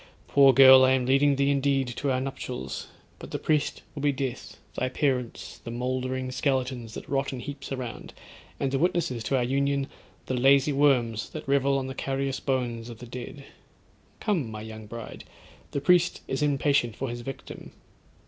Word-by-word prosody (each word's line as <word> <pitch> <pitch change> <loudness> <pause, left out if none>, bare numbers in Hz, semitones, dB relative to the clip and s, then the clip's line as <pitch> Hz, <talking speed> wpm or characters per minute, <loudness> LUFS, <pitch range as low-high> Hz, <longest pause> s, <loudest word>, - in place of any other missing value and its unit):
Poor 140 -1 +6
girl, 130 0 +9
I 130 0 +5
am 130 -1 +1
leading 140 +2 +4
thee 140 +1 +2
indeed 135 -2 +1
to 135 +4 -3
our 130 - +1
nuptials; 70 - -5 0.3
but - - -9
the - - -3
priest 150 -2 0
will 145 - -6
be 145 0 +3
death, 130 -2 -5 0.2
thy 130 - -1
parents 130 -3 -2
the - - -9
mouldering 130 +1 -2
skeletons 130 -4 -1
that - - -8
rot 135 0 -1
in 130 - -5
heaps 140 +1 -7
around; 130 -4 -5 0.5
and 135 -1 0
the 135 - 0
witnesses 170 -9 0
to 135 - +1
our 125 - +1
union, 140 +2 +1 0.4
the - - -3
lazy 135 +3 +4
worms 125 -6 +2
that 155 - -8
revel 140 0 +2
on 135 - -2
the 130 - -5
carious 135 0 -2
bones 120 -3 -2
of 115 - -9
the 120 - -10
dead. 125 +3 -8 0.7
Come, 175 - 0
my 110 -1 -7
young 110 -1 -9
bride, 115 +1 -8 0.5
the - - -2
priest 180 +3 +3
is 135 +1 -2
impatient 140 -5 +2
for 135 - -3
his 120 0 -5
victim.' 135 +2 -8
130 Hz, 180 wpm, -27 LUFS, 125-140 Hz, 0.7 s, girl